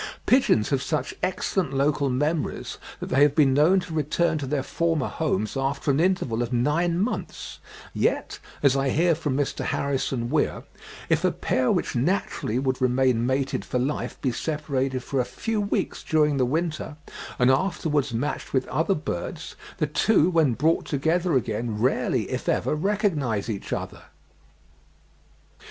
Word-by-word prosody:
Pigeons 250 - +3
have 135 -2 +1
such 150 -2 -2
excellent 185 -4 -1
local 140 0 +1
memories, 150 +5 -2 0.2
that - - -6
they 135 +2 +2
have 145 -1 +5
been 140 -4 +4
known 155 +7 +5
to 175 -2 -8
return 155 +2 +1
to 140 - -4
their 140 -1 -1
former 165 -3 0
homes 110 -9 -1
after 135 +2 0
an 135 - +1
interval 165 -10 +1
of 120 0 -2
nine 150 +8 +1
months, 215 +6 -3 0.3
yet, 410 - -1 0.2
as 140 -2 +5
I 135 0 +1
hear 170 +5 +3
from 150 -4 -2
Mr. 145 -1 -1
Harrison 135 -3 -1
Weir, 155 -1 0 0.4
if - - +1
a - - +4
pair 130 -1 0
which - - -1
naturally 125 - 0
would 130 0 -1
remain 125 -2 +2
mated 135 +1 0
for - - -2
life 135 +4 -2
be 130 - +1
separated 135 -2 -2
for 135 - -2
a - - +3
few 220 - -3
weeks 200 - -2
during 150 -3 +2
the 130 -2 +2
winter, 155 +1 -2 0.4
and 125 +1 +4
afterwards 150 -3 0
matched 130 +4 -3
with 130 -1 +1
other 165 +5 +1
birds, 165 +1 -5 0.2
the 160 - +1
two 170 +3 +3
when 155 -8 +3
brought 155 +8 +1
together 160 +5 +1
again, 115 -2 -1
rarely, 125 +4 +1
if - - -2
ever, - - +1
recognise 150 - 0
each 100 - -6
other. - - -4
145 Hz, 160 wpm, -25 LUFS, 130-165 Hz, 0.4 s, have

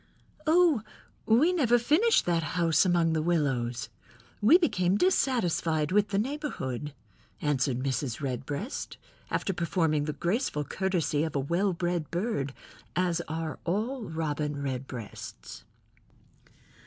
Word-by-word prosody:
"Oh, 325 -6 +5 0.5
we 275 +11 +5
never 245 -9 +4
finished 320 - +3
that 170 -1 +2 0.2
house 170 +2 +4
among 170 -2 +3
the 160 - +1
willows. 130 -8 0 0.5
We 265 +12 +7
became 185 - +1
dissatisfied 180 - +1
with 205 +1 +3
the 195 - -1
neighborhood," 200 - -3 0.4
answered 140 -3 0
Mrs. 130 -2 -2
Redbreast, 140 - -4 0.3
after 195 - -1
performing 165 -3 0
the 150 - -2
graceful 175 - -1
courtesy 175 -4 0
of 160 -2 -3
a - - +2
well 170 +8 +1
bred 175 -2 -2
bird, 170 - -2 0.4
as 180 -2 +1
are 160 -1 -4
all 220 +9 -1
Robin 150 -3 -2
Redbreasts. 130 -4 -6
170 Hz, 115 wpm, -28 LUFS, 145-210 Hz, 0.5 s, We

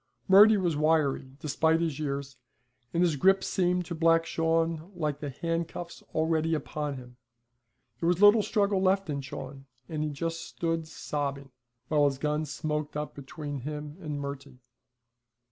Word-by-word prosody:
Murty 210 +3 +8
was 175 -5 0
wiry, 145 -3 +1
despite 160 +2 +2
his 160 -4 -1
years, 140 -2 -3 0.6
and 170 - +2
his 170 -4 +2
grip 190 +7 +4
seemed 180 -1 +1
to 170 - -5
Black 165 0 +3
Shawn 165 +1 0
like 150 -4 -2
the 145 - -4
handcuffs 170 +3 -4
already 160 0 +1
upon 150 -1 -3
him. 125 -1 -12 0.8
There 165 - 0
was 175 0 +2
little 205 +2 +7
struggle 200 -2 +1
left 190 -2 +2
in 140 -1 -2
Shawn, 135 +1 -8 0.2
and 155 -1 -3
he 155 - -1
just 165 +3 -3
stood 165 -1 -3
sobbing, 140 -3 -4 0.4
while 150 0 +3
his 140 -2 +1
gun 150 +2 -1
smoked 150 0 -3
up 150 0 -4
between 145 +1 -6
him 150 +2 -6
and 150 -5 -4
Murty. 140 -1 -7
155 Hz, 155 wpm, -29 LUFS, 145-170 Hz, 0.8 s, Murty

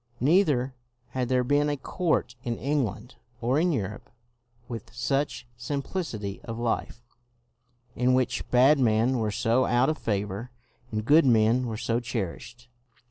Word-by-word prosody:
Never 140 -3 +3 0.4
had 125 -1 -2
there 125 -1 +2
been 145 +3 +2
a 145 - -1
court 160 -2 -1
in 120 -1 -2
England 125 -5 -2 0.2
or 125 +5 +1
in 175 +2 +2
Europe 105 - -4 0.6
with 115 -2 -7
such 125 +3 -1
simplicity 120 - -4
of 115 -1 -6
life, 120 0 -2 0.9
in 125 +1 +3
which 130 -1 -1
bad 135 +4 +5
men 120 +1 +2
were 110 -1 0
so 120 +3 +2
out 125 +3 +3
of 155 - -5
favor 105 +2 -2 0.4
and 110 -1 -2
good 150 +3 +6
men 115 +1 +3
were 110 -2 -4
so 115 +1 0
cherished. 115 +1 -5
125 Hz, 140 wpm, -27 LUFS, 115-135 Hz, 0.9 s, good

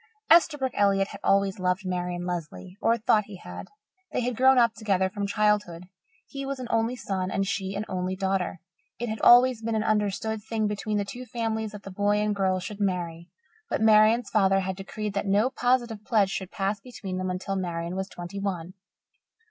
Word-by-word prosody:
Esterbrook 295 -6 +5
Elliott 195 -1 +2
had 200 - -9
always 195 0 +2
loved 180 +1 0
Marian 180 -1 -2
Lesley 180 +1 -5
or 230 +1 +3
thought 215 -2 +2
he 205 - -10
had. 90 - -9 0.4
They - - -1
had 245 0 -1
grown 260 +2 +5
up 235 -2 +4
together 195 -4 0
from 205 0 -3
childhood. 210 -4 +1 0.4
He 275 0 -7
was 275 0 -3
an 255 - -6
only 230 +2 +1
son 190 -6 -3
and 195 +1 0
she 195 0 -3
an 205 +2 -3
only 185 0 -2
daughter. 190 -2 -1 0.4
It 240 0 -3
had 220 0 -4
always 245 -1 +6
been 225 0 -2
an 215 - +1
understood 215 0 0
thing 220 0 -2
between 210 0 -2
the 205 - -1
two 245 +5 -8
families 220 -2 -2
that 205 -1 -9
the 195 - -8
boy 205 +2 +1
and 210 0 0
girl 190 -1 +1
should 200 +3 -7
marry. 175 -4 -2 0.4
But - - -1
Marian's 220 +2 +5
father 195 -2 +3
had 190 0 -3
decreed 205 +2 -5
that 200 0 -2
no 210 +6 +3
positive 245 -4 0
pledge 215 -6 +2
should 190 -2 -4
pass 200 +2 -2
between 195 -5 -6
them 185 0 -2
until 185 +2 -3
Marian 170 -2 -3
was 190 0 -3
twenty 175 +3 -7
one. 185 -3 -3
200 Hz, 195 wpm, -26 LUFS, 190-220 Hz, 0.4 s, always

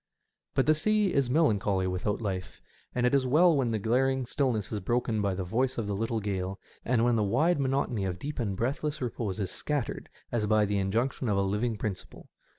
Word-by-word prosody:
But 135 - +3
the 155 - +5
sea 210 +5 +1
is 135 -3 +2
melancholy 105 - +2
without 95 +4 -1
life, 95 -3 -4 0.4
and 125 0 +1
it 125 - +2
is 135 -2 +3
well 165 +5 +5
when 130 -4 +1
the 110 - 0
glaring 130 +5 +1
stillness 120 -6 -1
is 105 - -2
broken 115 +2 0
by 100 -2 0
the 95 - -3
voice 125 +8 0
of 115 - -1
the 100 - -2
little 115 +3 -1
gale, 95 -2 -3 0.2
and 115 -1 +2
when 120 -1 +3
the 110 - +2
wide 145 - +2
monotony 130 -6 0
of 90 -2 -2
deep 145 +9 -5
and 100 -5 -2
breathless 145 +6 -1
repose 110 -5 -3
is 95 -3 -2
scattered 145 -5 -3 0.2
as 110 -3 0
by 110 0 +4
the 100 0 0
injection 115 +6 0
of 100 - +2
a - - +3
living 105 +4 0
principle. 105 -3 -6
115 Hz, 210 wpm, -29 LUFS, 100-135 Hz, 0.4 s, the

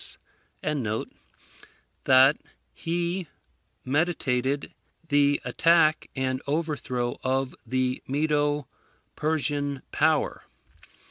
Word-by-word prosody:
] 150 -2 -5 1.2
that 130 +2 +7 0.4
he 170 +1 -2 0.6
meditated 140 -2 0 0.4
the 145 -1 +4
attack 155 +4 +3
and 130 -1 -1
overthrow 140 -5 -2
of 130 0 0
the 130 +1 0
Medo 145 0 +1 0.5
Persian 145 -3 -1
power. - - +1
145 Hz, 70 wpm, -26 LUFS, 130-155 Hz, 1.2 s, that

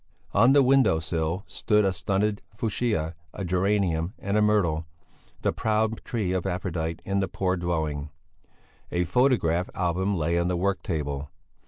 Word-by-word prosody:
On 115 +6 +6
the 140 -1 +6
window 130 -9 +4
sill 80 +3 -2
stood 105 -1 +1
a 95 - +2
stunted 100 +4 0 0.2
fuchsia, 105 -8 -1 0.2
a 100 - -4
geranium 90 -1 +1
and 100 +1 -2
a 105 - +4
myrtle 85 -7 +2 0.6
the - - +2
proud 110 0 0
tree 105 -7 -2
of 95 0 -1
Aphrodite 85 -3 -3
in 100 0 0
the 95 - 0
poor 95 +1 -1
dwelling. 80 -4 -2 0.8
A 90 0 +1
photograph 90 -4 +2
album 95 +3 0
lay 85 +2 +1
on 85 - +1
the 90 -1 0
work 100 +2 0
table. 75 -4 -3
90 Hz, 155 wpm, -26 LUFS, 85-105 Hz, 0.8 s, On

